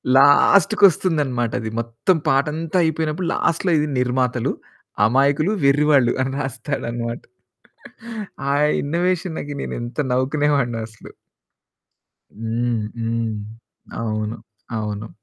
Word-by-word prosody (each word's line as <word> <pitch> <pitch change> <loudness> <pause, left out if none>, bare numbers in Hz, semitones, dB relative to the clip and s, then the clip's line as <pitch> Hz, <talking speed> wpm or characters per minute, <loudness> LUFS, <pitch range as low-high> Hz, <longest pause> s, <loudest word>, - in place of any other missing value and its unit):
లాస్టుకొస్తుందన్నమాటది, 145 - +4
మొత్తం 115 +10 0
పాటంతా 155 +5 0
అయిపోయినప్పుడు 160 +2 -1
లాస్ట్‌లో 170 +2 0
ఇది 150 - 0
నిర్మాతలు 125 -1 0 0.5
అమాయకులు, 140 - +2
వెర్రివాళ్లు 140 -3 +4
అని 130 +1 -1
రాస్తాడనమాట. 120 -3 -4 1.3
ఆ - - +2 0.3
ఇన్నోవేషన్‌కి 170 -1 -2
నేనెంత 120 +5 -4
నవ్వుకునే 140 +4 +1
వాడినో 120 -4 -1
అసలు. 110 -1 -14 1.3
హ్మ్, 115 0 -1 0.2
హ్మ్. 115 -1 -1 0.7
అవును, 110 0 -3 0.4
అవును. 105 0 -4
135 Hz, 85 wpm, -21 LUFS, 115-155 Hz, 1.3 s, లాస్టుకొస్తుందన్నమాటది